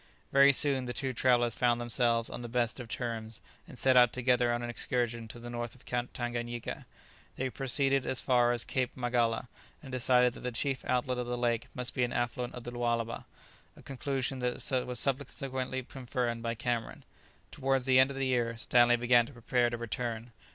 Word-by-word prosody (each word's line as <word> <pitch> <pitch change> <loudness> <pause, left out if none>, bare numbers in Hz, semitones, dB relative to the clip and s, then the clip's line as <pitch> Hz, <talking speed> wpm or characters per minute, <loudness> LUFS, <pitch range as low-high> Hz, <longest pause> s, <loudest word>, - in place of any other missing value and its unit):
Very 140 0 +7
soon 135 -1 +3
the 120 - -4
two 135 -2 -1
travellers 120 -1 +3
found 120 0 +2
themselves 120 -1 +1
on - - -7
the 120 - -6
best 120 +1 -1
of 120 - -7
terms, 115 -2 -4 0.3
and - - -12
set 130 -1 +3
out 125 -1 +7
together 125 -1 +2
on 120 0 -1
an 120 - -4
excursion 120 -1 -1
to 115 - -9
the 120 0 -8
north 120 0 -5
of 125 - -20
Tanganyika. 120 -1 -4 0.5
They 130 0 -2
proceeded 135 +1 +1
as 130 - 0
far 120 -2 +3
as 120 -1 0
Cape 130 -1 -2
Magala, 120 -1 0 0.4
and 135 - -9
decided 125 -1 +3
that - - -10
the 125 - -4
chief 135 +3 -1
outlet 125 0 0
of 125 - -3
the 125 0 -2
lake 120 -1 0
must 125 -1 -2
be 125 - 0
an 120 - -1
affluent 120 0 -2
of 125 - -8
the 120 - -6
Lualaba, 120 -1 -2 0.5
a - - -15
conclusion 135 0 -2
that 125 +1 0
was 125 -1 -2
subsequently 130 -1 -2
confirmed 125 -2 -3
by 115 0 -2
Cameron. 120 0 -3 0.5
Towards 135 -1 0
the 130 -1 +5
end 130 +1 +6
of 140 - -6
the 135 - 0
year 120 -3 0
Stanley 120 +2 +4
began 120 0 +4
to 140 - -12
prepare 120 0 +1
to 120 - -4
return. 115 0 -4
120 Hz, 195 wpm, -31 LUFS, 120-130 Hz, 0.5 s, Very